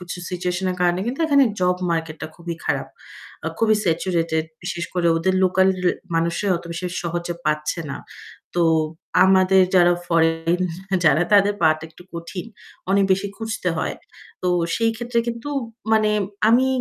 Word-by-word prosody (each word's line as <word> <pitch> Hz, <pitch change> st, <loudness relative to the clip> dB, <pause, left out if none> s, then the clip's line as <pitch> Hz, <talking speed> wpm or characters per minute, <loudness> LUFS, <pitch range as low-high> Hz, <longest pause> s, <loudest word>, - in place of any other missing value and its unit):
কিছু 180 Hz, 0 st, -6 dB
situation-এর 180 Hz, +1 st, -2 dB
কারণে 175 Hz, 0 st, +2 dB
কিন্তু 265 Hz, +7 st, -3 dB
এখানে 280 Hz, -2 st, +5 dB, 0.2 s
job 180 Hz, 0 st, +2 dB
market 160 Hz, -1 st, -2 dB
টা 155 Hz, -, -2 dB
খুবই 170 Hz, -1 st, -5 dB
খারাপ। -, -, -1 dB, 0.6 s
আ -, -, +2 dB
খুবই 220 Hz, -1 st, +4 dB
saturated 165 Hz, -2 st, 0 dB, 0.2 s
বিশেষ 175 Hz, 0 st, -3 dB
করে 175 Hz, -1 st, +1 dB
ওদের 185 Hz, +3 st, +1 dB
local 190 Hz, +1 st, +3 dB, 0.5 s
মানুষরাই 170 Hz, +4 st, 0 dB
অত 170 Hz, -, -9 dB
বেশি 170 Hz, +2 st, -5 dB, 0.2 s
সহজে 175 Hz, 0 st, -3 dB
পাচ্ছে 150 Hz, +2 st, -1 dB
না। -, -, -5 dB, 0.6 s
তো 175 Hz, -, +3 dB, 0.6 s
আমাদের 190 Hz, 0 st, +5 dB
যারা 175 Hz, -1 st, +6 dB
foreign 165 Hz, +1 st, +2 dB, 0.4 s
যারা 155 Hz, +2 st, +5 dB
তাদের 205 Hz, 0 st, +5 dB
পাওয়াটা 155 Hz, 0 st, +3 dB
একটু 160 Hz, -, -16 dB
কঠিন। 170 Hz, +4 st, -6 dB, 0.4 s
অনেক 200 Hz, 0 st, +4 dB
বেশি 195 Hz, +2 st, 0 dB
খুঁজতে 220 Hz, -5 st, -3 dB
হয়। -, -, -2 dB, 0.5 s
তো 180 Hz, -, +1 dB, 0.3 s
সেই 230 Hz, 0 st, +2 dB
ক্ষেত্রে 240 Hz, 0 st, -2 dB
কিন্তু 235 Hz, +4 st, -5 dB, 0.4 s
মানে 215 Hz, -1 st, +4 dB, 0.4 s
আমি 245 Hz, +3 st, +5 dB
180 Hz, 150 wpm, -22 LUFS, 170-200 Hz, 0.6 s, যারা